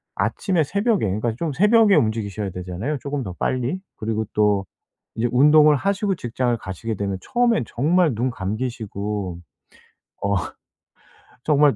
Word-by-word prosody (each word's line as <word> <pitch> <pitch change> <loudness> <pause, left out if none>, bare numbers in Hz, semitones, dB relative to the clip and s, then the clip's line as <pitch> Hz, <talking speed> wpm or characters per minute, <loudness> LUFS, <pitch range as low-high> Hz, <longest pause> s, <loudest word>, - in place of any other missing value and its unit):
아침에 180 -5 0
새벽에 200 - +1
그러니까 110 +4 -1
좀 160 +4 -2
새벽에 210 - +5
움직이셔야 105 -3 0
되잖아요 90 - -4
쪼금 140 -2 -3
더 95 - -6
빨리. 130 +8 -1 0.2
그리고 110 0 -2
또 105 -2 +2 0.5
이제 115 +2 0
운동을 150 +3 +6
하시고 200 +5 0
직장을 120 -3 -1
가시게 110 +3 -5
되면 100 -1 -2
처음엔 240 -2 +1
정말 160 +4 +2
눈 120 +4 0
감기시고 105 -4 -4 0.8
어 100 0 +1 1.1
정말 145 -2 +4
120 Hz, 310 characters per minute, -22 LUFS, 105-155 Hz, 1.1 s, 운동을